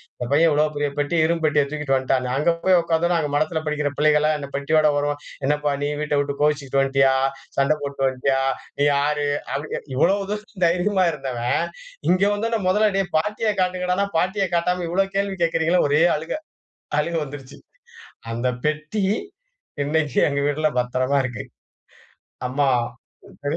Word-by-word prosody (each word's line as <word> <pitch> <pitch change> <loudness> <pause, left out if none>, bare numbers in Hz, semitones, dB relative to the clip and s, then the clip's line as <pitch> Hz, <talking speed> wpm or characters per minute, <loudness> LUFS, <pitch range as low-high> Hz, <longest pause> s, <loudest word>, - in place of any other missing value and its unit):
இந்த 120 - -5
பையன் 160 +4 +5
இவ்வளவு 150 +1 +2
பெரிய 145 0 0
பெட்டிய, 155 +2 +2
இரும்பு 165 0 -1
பெட்டிய 150 -1 +3
தூக்கிட்டு 150 -3 0
வந்த்ட்டான்னு. 130 -1 0
அங்க 160 +4 +2
போய் 185 -1 +5
உக்காந்தோன்ன, 170 +1 +1
அங்க 150 -2 -1
மடத்தில 155 +2 0
படிக்கிற 150 -1 -1
பிள்ளைகள்லாம் 150 0 +3
இந்த 140 -1 -7
பெட்டியோட 155 +2 +3
வரவும், 145 0 -1 0.3
"என்னப்பா 150 0 +1
நீ 145 - 0
வீட்டை 150 -1 0
விட்டு 140 0 -4
கோவிச்சுக்ட்டு 140 -2 +1
வந்த்டியா? 135 -1 +3 0.4
சண்டை 140 +3 +3
போட்டுட்டு 140 -1 -1
வந்த்டியா? 135 +1 0 0.4
நீ - - +3
யாரு?" 145 +1 +1 0.3
அப்டி 150 +2 -4
கே - - -4
இவ்வளவு 195 +7 +2
தூரம் 210 -3 -5
தைரியமா 185 +2 +2
இருந்தவன் 125 -4 -1 0.5
இங்க 185 +2 +3
வந்தோன்ன, 225 +1 -1
முதல்ல 210 +3 +3
டேய் 195 -2 -2
பாட்டிய 210 +5 -1
காட்டுங்கடான்னா 180 +1 0
பாட்டிய 190 +3 +1
காட்டாம 180 +1 0
இவ்வளவு 195 +2 0
கேள்வி 200 -1 -1
கேக்கறீங்கலேன்னு, 165 0 +2
ஒரே 150 +3 +4
அழுகை, 160 - -4 0.6
அழுகை 170 +2 -1
வந்துருச்சு. 135 -2 -10 0.8
அந்த 120 +2 -1 0.2
பெட்டி 155 +7 -2 0.8
இன்னைக்கும் 150 -1 +1
எங்க 140 -1 -1
வீட்ல 150 +2 +1
பத்திரமா 130 +3 +1
இருக்கு. 125 -4 -4 1.0
அம்மாவும் 125 -2 -2
சரி 145 +2 -1
150 Hz, 155 wpm, -22 LUFS, 140-175 Hz, 1.0 s, பையன்